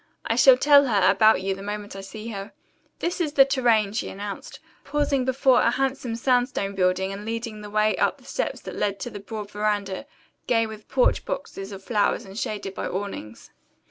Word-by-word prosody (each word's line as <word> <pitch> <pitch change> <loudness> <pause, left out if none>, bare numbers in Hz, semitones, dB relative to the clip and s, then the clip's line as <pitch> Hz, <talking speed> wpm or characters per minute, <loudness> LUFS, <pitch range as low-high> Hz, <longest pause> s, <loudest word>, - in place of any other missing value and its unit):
I - - 0
shall - - +7
tell 285 - +6
her 205 -6 +3
about 210 0 +4
you 195 0 0
the 195 - -9
moment 205 0 -5
I 195 - -6
see 215 +3 -8
her. 200 -1 -7 0.4
This 350 +1 -2
is 305 -4 -1
the 275 -2 +7
Tourraine," 235 -7 +2
she 220 - -2
announced, 200 +1 -7 0.2
pausing 285 -3 0
before 260 0 +3
a - - +4
handsome 265 -2 -1
sandstone 245 -4 +1
building 190 0 +1
and 200 +1 -7
leading 225 -1 -5
the 210 - -8
way 215 +1 +2
up - - +1
the - - -21
steps - - -3
that - - -8
led 200 -1 -1
to 245 - -4
the 205 - -7
broad 210 0 -7
veranda, 205 +2 -2 0.4
gay 225 -2 +3
with 215 -1 -10
porch 255 -2 +2
boxes 200 -8 -5
of 195 -1 -9
flowers 210 -2 0
and 195 +3 -7
shaded 205 -4 -4
by - - -4
awnings. 185 - -6
215 Hz, 200 wpm, -25 LUFS, 200-250 Hz, 0.4 s, shall